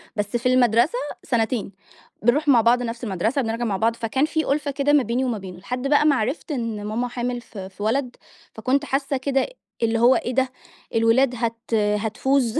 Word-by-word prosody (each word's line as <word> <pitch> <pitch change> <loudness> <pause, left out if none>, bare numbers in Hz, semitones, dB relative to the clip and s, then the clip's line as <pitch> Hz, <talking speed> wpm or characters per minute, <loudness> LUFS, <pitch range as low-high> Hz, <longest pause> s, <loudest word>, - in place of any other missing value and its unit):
بس 210 +3 -1
في 250 +2 +1
المَدرسة 245 - +3 0.3
سنتين. 225 -3 -1 0.5
بنرُوح 275 +7 +2
مع 250 -5 +6
بعض 240 +2 +3
نفس 235 +1 -5
المَدرسة، 220 +6 0
بنرجع 230 +1 -2
مع 200 -3 -1
بعض، 225 +2 +1
فكان 245 +4 0
في 315 0 -1
أُلفة 285 0 0
كده 285 +1 +1
ما 285 -3 +5
بيني 240 +4 -1
وما 240 -4 -1
بينه. 185 -2 -9
لحد 250 +6 -4
بقى 295 +1 +4
ما 290 -2 +5
عرفت 260 +7 -2
إن 230 -6 -3
ماما 230 +4 -2
حامل 245 0 -3
في 195 -5 -9
في 195 +2 -9
ولد، 250 +3 0 0.4
فكنت 265 +6 0
حاسة 275 0 -1
كده 270 0 0 0.4
اللي 230 0 +2
هو 245 +2 +6
إيه 250 - -2
ده! 260 -1 +2 0.5
الولاد 240 +3 +3
هت 230 0 -4
هتفوز، 220 +4 +1
240 Hz, 190 wpm, -23 LUFS, 225-265 Hz, 0.5 s, مع